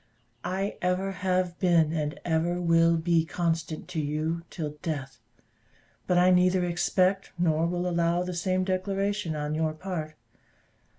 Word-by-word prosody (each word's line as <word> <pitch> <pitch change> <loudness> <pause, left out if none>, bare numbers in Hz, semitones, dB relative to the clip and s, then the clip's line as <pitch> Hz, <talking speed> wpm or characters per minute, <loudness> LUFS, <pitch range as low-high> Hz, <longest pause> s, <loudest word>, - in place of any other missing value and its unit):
I 190 +3 -2
ever 185 +2 0
have 185 -2 -1
been, 165 -4 +3
and 150 -2 -2
ever 170 +1 +1
will 165 -1 +4
be 165 0 +2
constant 165 -2 -2
to 175 -3 -3
you, 155 +3 -1
till 155 -4 -4
death; 135 -6 -4 0.9
but 180 - +3
I 180 +1 +5
neither 180 0 +4
expect, 185 +2 +1
nor 165 -1 +2
will 175 +1 -1
allow 170 0 +1
of - - -2
the 180 - -4
same 185 +2 0
declaration 195 -1 -1
on 150 0 -2
your 155 0 0
part. 155 -2 -5
175 Hz, 145 wpm, -27 LUFS, 160-185 Hz, 0.9 s, I